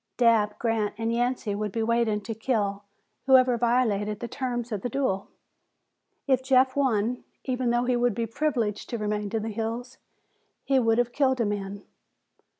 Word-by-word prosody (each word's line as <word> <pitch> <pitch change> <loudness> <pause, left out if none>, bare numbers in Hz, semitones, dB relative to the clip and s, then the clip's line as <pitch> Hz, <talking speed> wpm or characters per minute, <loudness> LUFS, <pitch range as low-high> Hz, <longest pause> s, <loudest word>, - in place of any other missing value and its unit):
Dabb, 225 -4 +3
Grant 225 -3 -1
and 225 +1 -1
Yancey 240 -3 0
would 210 0 -3
be 225 +2 -1
waiting 230 -2 +1
to 225 +3 -5
kill 210 -3 -1 0.4
whoever 255 -2 +6
violated 220 -4 +1
the 235 - -4
terms 245 -2 -3
of 210 -3 -2
the 245 - -2
duel. 220 -7 -1 1.0
If 260 -2 +2
Jeff 260 0 +3
won, 245 -3 +1 0.2
even 255 -2 -1
though 240 +1 +1
he 250 0 +2
would 240 -3 +1
be 230 - -1
privileged 230 -4 -2
to 235 - -2
remain 210 -1 -2
in 225 -2 -1
the 225 - -3
hills, 230 +4 -4 0.6
he 270 -1 +3
would 225 -2 +2
have 245 0 +1
killed 260 -3 +2
a 230 - +2
man. 205 -1 -4
230 Hz, 170 wpm, -26 LUFS, 210-250 Hz, 1.0 s, whoever